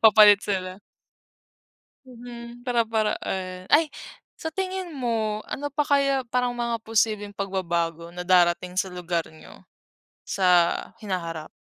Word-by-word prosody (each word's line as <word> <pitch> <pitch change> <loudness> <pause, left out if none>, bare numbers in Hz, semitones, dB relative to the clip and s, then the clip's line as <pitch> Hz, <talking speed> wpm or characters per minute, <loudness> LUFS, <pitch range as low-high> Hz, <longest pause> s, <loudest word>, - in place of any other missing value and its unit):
papalit 210 -2 +8
sila. 185 -1 -3 1.3
Mhm, 240 -1 -11
para-paraan. 215 -6 -1
Ay, 310 +2 +6 0.5
sa 320 - -5
tingin 375 +1 -3
mo, 230 -7 -1
ano 290 +1 -4
pa 290 +1 0
kaya, 275 -2 +2
parang 250 +1 0
mga 235 -2 -2
posibleng 215 -2 +1
pagbabago 170 -4 -2
na 180 0 -7
darating 180 0 +3
sa 185 +1 0
lugar 175 -1 -2
niyo, 160 - -15 0.6
sa 180 -3 +4 0.2
hinaharap? 170 -6 -4
210 Hz, 115 wpm, -25 LUFS, 180-245 Hz, 1.3 s, papalit